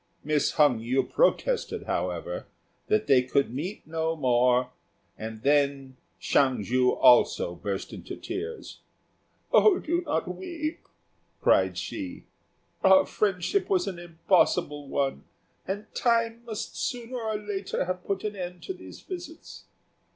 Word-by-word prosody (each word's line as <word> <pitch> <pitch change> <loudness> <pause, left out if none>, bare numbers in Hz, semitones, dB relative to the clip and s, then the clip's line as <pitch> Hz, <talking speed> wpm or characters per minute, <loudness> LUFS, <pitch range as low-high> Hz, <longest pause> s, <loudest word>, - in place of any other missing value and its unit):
Miss 150 -1 +1
Hung 145 -7 +4
yü 125 +4 0
protested, - - +1
however, - - -3 0.4
that 215 0 +2
they 135 -3 +5
could 125 0 0
meet 175 +11 -5
no 160 0 -1
more, 125 -2 +2 0.4
and 110 0 -7
then 140 -2 +1 0.2
Hsiang 130 -6 +2
ju 125 +4 +2
also 125 -8 +5
burst 95 +3 -5
into - - -7
tears. 460 +1 -6 0.7
"Do 355 -4 +4
not 295 - -1
weep," 305 - -5 0.5
cried - - +3
she, 275 -3 -5 0.6
"our 190 0 +7
friendship 200 - 0
was 380 -3 +2
an 185 -3 -5
impossible 170 -3 +1
one, 135 0 -1 0.4
and 200 +3 -3
time 230 -1 +1
must 220 -3 -5
sooner 245 0 -3
or 220 -1 -2
later 205 -3 -3
have 180 0 -3
put 195 -1 -2
an 210 -1 -3
end 180 -2 -6
to 380 - -4
these - - -12
visits. 345 -3 -9
180 Hz, 130 wpm, -27 LUFS, -, 0.7 s, our